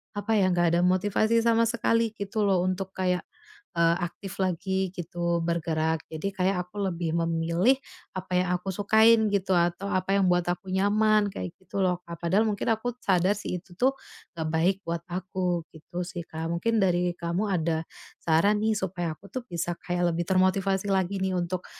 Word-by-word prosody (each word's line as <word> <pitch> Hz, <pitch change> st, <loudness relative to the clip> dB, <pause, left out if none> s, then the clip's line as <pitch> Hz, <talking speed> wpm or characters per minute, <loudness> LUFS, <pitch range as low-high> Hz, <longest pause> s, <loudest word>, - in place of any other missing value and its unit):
apa 205 Hz, +2 st, -3 dB
ya, 185 Hz, -, +4 dB
nggak 175 Hz, -1 st, +3 dB
ada -, -, +2 dB
motivasi 205 Hz, +5 st, +2 dB
sama 230 Hz, 0 st, +4 dB
sekali, 230 Hz, -1 st, +1 dB
gitu 205 Hz, +1 st, -2 dB
loh, 185 Hz, -2 st, +3 dB
untuk 185 Hz, +1 st, -2 dB
kayak, 180 Hz, -1 st, 0 dB, 0.5 s
eee, 170 Hz, 0 st, +4 dB
aktif 190 Hz, +2 st, -5 dB
lagi 190 Hz, +1 st, 0 dB
gitu, 170 Hz, -1 st, -2 dB
bergerak. 160 Hz, -1 st, 0 dB
Jadi 190 Hz, +5 st, -3 dB
kayak 180 Hz, -1 st, 0 dB
aku 205 Hz, +2 st, -6 dB
lebih 170 Hz, -2 st, -3 dB
memilih 170 Hz, +9 st, +2 dB, 0.4 s
apa 185 Hz, 0 st, -5 dB
yang 180 Hz, -, -2 dB
aku 190 Hz, +2 st, -6 dB
sukain 220 Hz, +2 st, +5 dB
gitu, 195 Hz, -1 st, +1 dB
atau 175 Hz, +3 st, 0 dB
apa 185 Hz, +2 st, +1 dB
yang 195 Hz, -, +3 dB
buat 175 Hz, -1 st, +2 dB
aku 185 Hz, +2 st, -3 dB
nyaman, 210 Hz, +1 st, +3 dB
kayak 180 Hz, -, -5 dB
gitu 190 Hz, -, -8 dB
loh, 180 Hz, -1 st, +1 dB
Kak. 170 Hz, -1 st, -7 dB
Padahal 195 Hz, +6 st, +2 dB
mungkin 200 Hz, -, -3 dB
aku 245 Hz, +2 st, -4 dB
sadar 185 Hz, +1 st, +3 dB
sih, 180 Hz, -, -3 dB
itu 180 Hz, -, -18 dB
tuh 265 Hz, +2 st, +3 dB, 0.4 s
nggak 160 Hz, -1 st, -3 dB
baik 170 Hz, +4 st, +2 dB
buat 170 Hz, 0 st, -3 dB
aku, 180 Hz, -1 st, -2 dB
gitu 175 Hz, +3 st, -7 dB
sih, 175 Hz, -1 st, -6 dB
Kak. 160 Hz, +1 st, -5 dB
Mungkin 225 Hz, +7 st, 0 dB
dari 175 Hz, -1 st, +2 dB
kamu 170 Hz, +5 st, -2 dB
ada 165 Hz, -3 st, 0 dB, 0.4 s
saran 170 Hz, +6 st, +3 dB
nih, 220 Hz, -, +3 dB
supaya 175 Hz, -4 st, -2 dB
aku 200 Hz, -, -16 dB
tuh 255 Hz, -2 st, -4 dB
bisa 175 Hz, 0 st, -3 dB
kayak 175 Hz, -1 st, 0 dB
lebih 170 Hz, 0 st, -1 dB
termotivasi 190 Hz, +1 st, +2 dB
lagi 190 Hz, 0 st, 0 dB
nih, 185 Hz, -1 st, 0 dB
untuk, 175 Hz, +1 st, -2 dB
185 Hz, 180 wpm, -27 LUFS, 170-200 Hz, 0.5 s, sukain